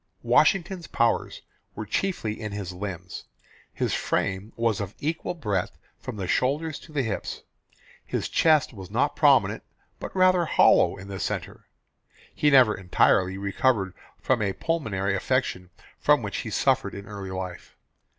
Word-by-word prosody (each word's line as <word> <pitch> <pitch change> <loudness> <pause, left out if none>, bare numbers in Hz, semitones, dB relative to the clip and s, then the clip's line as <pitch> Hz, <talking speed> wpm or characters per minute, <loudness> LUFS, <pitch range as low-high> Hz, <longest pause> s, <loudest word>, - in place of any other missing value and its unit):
Washington's 185 -2 +2
powers 115 0 0 0.3
were 110 - -5
chiefly 110 - -2
in 105 -2 -5
his 100 -3 -5
limbs. 90 -1 -6 0.5
His - - -2
frame 100 +3 -1
was 115 -2 0
of 100 0 -6
equal 160 +3 -3
breadth 105 - -2 0.2
from - - -7
the 95 -2 -4
shoulders 145 - 0
to 160 - -15
the 145 -3 0
hips. 110 -4 -4 0.6
His - - -3
chest 155 -5 +3
was 95 -4 -9
not - - 0
prominent - - +4 0.4
but - - -7
rather 185 -2 +4
hollowed 125 - +4
in 95 - -10
the 95 -1 -6
centre. - - -4 0.7
He 150 - +2
never 130 -6 +6
entirely 95 0 +2
recovered 100 0 0 0.3
from 130 -4 +1
a 100 -2 0
pulmonary 100 -13 -1
affection 95 -4 -1 0.3
from - - +3
which - - -4
he - - -4
suffered - - +1
in 100 0 -8
early 100 -2 -7
life. 95 -2 -7
105 Hz, 150 wpm, -26 LUFS, 95-145 Hz, 0.7 s, never